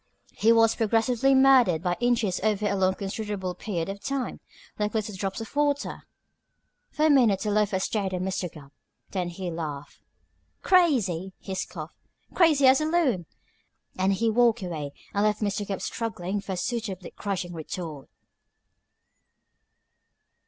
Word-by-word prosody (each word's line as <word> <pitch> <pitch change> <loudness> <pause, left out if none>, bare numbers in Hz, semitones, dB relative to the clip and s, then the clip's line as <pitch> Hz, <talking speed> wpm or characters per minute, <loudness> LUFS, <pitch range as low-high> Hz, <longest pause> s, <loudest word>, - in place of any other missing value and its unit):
He 225 - +3
was 225 -1 +5
progressively 235 +4 +2
murdered 255 -11 +5
by 175 -1 +1
inches 230 -6 +1
over 210 0 0
a 205 - +1
long 190 -1 +2
considerable 200 -2 -4
period 175 -2 -3
of 195 +1 -5
time, 275 -2 -3 0.4
like 210 +1 -1
little 215 -1 -1
drops 195 +2 -3
of 225 - -9
water." 290 -1 -1 0.8
For 305 - 0
a - - +5
minute 230 -9 +4
the 210 - -1
loafer 205 -2 +2
stared 195 0 -1
at 180 -1 -2
Mr. 185 -2 -2
Gubb. 140 -2 -13 0.4
Then 180 -3 -2
he 175 0 -5
laughed. 150 -4 -6 0.6
"Crazy!" 215 - +2
he 195 - -7
scoffed. 165 -4 -5 0.4
"Crazy 310 -6 +4
as 260 +2 +6
a - - +1
loon!" 285 - +1 0.7
and 190 +1 +2
he 225 +3 +1
walked 235 -1 +3
away 155 -5 -4 0.2
and 205 - +1
left 210 0 +2
Mr. 205 -1 -2
Gubb 195 -2 -4
struggling 205 -4 -3
for 195 - -5
a - - -4
suitably 195 -3 -3
crushing 185 -3 -3
retort. 160 -2 -6
205 Hz, 150 wpm, -26 LUFS, 185-235 Hz, 0.8 s, as